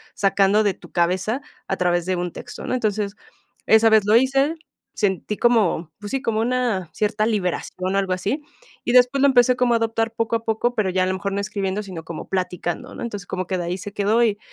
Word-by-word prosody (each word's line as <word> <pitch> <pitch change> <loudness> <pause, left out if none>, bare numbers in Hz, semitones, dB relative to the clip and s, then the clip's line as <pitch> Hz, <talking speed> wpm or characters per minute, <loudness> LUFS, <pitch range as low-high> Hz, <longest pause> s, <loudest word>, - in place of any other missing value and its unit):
sacando 200 +1 +3
de 205 -2 +2
tu - - -16
cabeza 185 +8 0 0.3
a 190 - -1
través 175 -1 +1
de 185 - +1
un 175 -1 -3
texto, - - -8
¿no? - - -1
Entonces, 210 -4 -1 0.5
esa 220 +1 +6
vez 220 -1 +6
lo 210 +2 +4
hice, 270 +5 +2 0.4
sentí 205 0 -1
como, 205 -9 +2
pues 205 0 -7
sí, 270 - -1
como 225 -4 0
una 235 -7 0
cierta 210 0 0
liberación, 185 -2 -2
algo 195 -2 +1
así, 200 +11 -2 0.4
y 240 - 0
después 250 +2 +5
lo 280 - +6
empecé 250 -2 +5
como 250 -1 +2
a - - +4
adoptar 225 0 -1
poco 230 0 -1
a 225 - -15
poco, 225 +2 0
pero 210 -5 +1
ya 185 0 +1
a - - +2
lo 185 - 0
mejor 200 +1 -3
no 200 - -1
escribiendo, 200 -1 -2
sino 185 -5 -8
como 165 -1 -7
platicando, 180 -2 -3
¿no? - - -6
Entonces, 205 -6 -6
como 185 0 -3
que 185 - -1
de 175 - -3
ahí 175 +2 -2
se 200 +2 -8
quedó. 210 +3 +2
Y 210 -3 +1
205 Hz, 225 wpm, -22 LUFS, 185-230 Hz, 0.5 s, esa